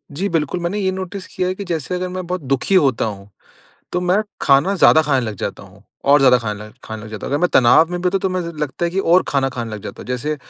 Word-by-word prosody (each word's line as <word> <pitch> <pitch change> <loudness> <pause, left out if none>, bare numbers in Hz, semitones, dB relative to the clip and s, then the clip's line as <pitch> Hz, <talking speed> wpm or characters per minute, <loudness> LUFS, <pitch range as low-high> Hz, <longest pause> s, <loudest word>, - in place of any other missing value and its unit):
जी 190 +7 -1
बिल्कुल, 165 +1 -1
मैंने 175 +4 -2
ये 190 -1 0
नोटिस 190 0 -6
किया 180 - -2
है 185 - -2
कि 200 - -6
जैसे 170 0 -3
अगर 180 0 -2
मैं 185 0 -5
बहुत 180 -1 -3
दुखी 135 +8 0
होता 140 -11 +3
हूँ 100 -2 -6 0.6
तो 180 - 0
मैं 180 +2 +2 0.3
खाना 140 +8 +4
ज़्यादा 160 -3 +6
खाने 140 -3 +1
लग 110 - -4
जाता - - -5
हूँ। - - -17 0.2
और 145 +1 +6
ज़्यादा 130 -2 +6
खाने 105 -2 -5
ल - - -18
खाने 110 -1 -7
लग 110 - -9
जाता 110 - -6
हूँ। - - -5
अगर 145 - +1
मैं 180 - +3
तनाव 130 +6 +5
में 175 0 -3
भी 180 - -2
होता 190 +2 +2
हूँ - - -2
तो 190 - 0
मुझे 180 -2 -2
लगता 150 +3 -2
है 170 - 0
कि 190 - -3
और 180 -1 +4
खाना 135 -1 +1
खाने 120 -3 -5
लग 105 -2 -7
जाता - - -8
हूँ। - - -14
जैसे 145 +5 -2
160 Hz, 285 wpm, -19 LUFS, 130-180 Hz, 0.6 s, ज़्यादा